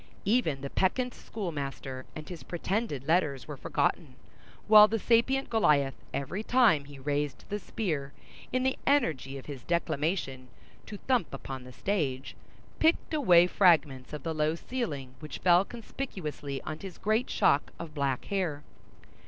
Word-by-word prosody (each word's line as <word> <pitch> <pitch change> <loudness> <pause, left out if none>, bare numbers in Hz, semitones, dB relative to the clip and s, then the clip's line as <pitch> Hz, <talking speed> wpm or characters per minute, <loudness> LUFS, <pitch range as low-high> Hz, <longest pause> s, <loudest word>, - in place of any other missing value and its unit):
Even 195 - +1
the 140 - -5
peccant 245 +6 +1
schoolmaster 140 - -5
and 155 -1 -8
his 175 -2 -8
pretended 175 - -3
letters 155 -6 +1
were - - -5
forgotten, - - -1 0.5
while 210 0 +9
the 225 +2 0
sapient 240 +5 +2
Goliath, 145 - +3 0.2
every 140 +9 -3
time 225 - +4
that 140 - -16
he 145 - -11
raised 145 +1 -2
the 205 - -2
spear, 155 -10 -3 0.4
in 255 0 +1
the 265 0 0
energy 160 - +1
of 135 - -10
his 140 -4 -7
declamation, 150 -3 -1 0.4
to 210 - -7
thump 245 -5 0
upon 130 -2 -7
the 125 - -11
stage, 140 -5 -2 0.4
picked 320 0 +2
away 180 - +6
fragments 160 -9 +3
of 150 -2 -6
the 165 - -2
low 155 +1 +1
ceiling, 155 - -4
which 155 -1 -7
fell 180 0 +5
conspicuously 185 - -6
on 155 0 -5
his 190 0 -8
great 220 +4 0
shock 140 - +2
of 165 -2 -8
black 140 -3 -1
hair. 175 -7 -2
165 Hz, 150 wpm, -29 LUFS, 140-215 Hz, 0.5 s, while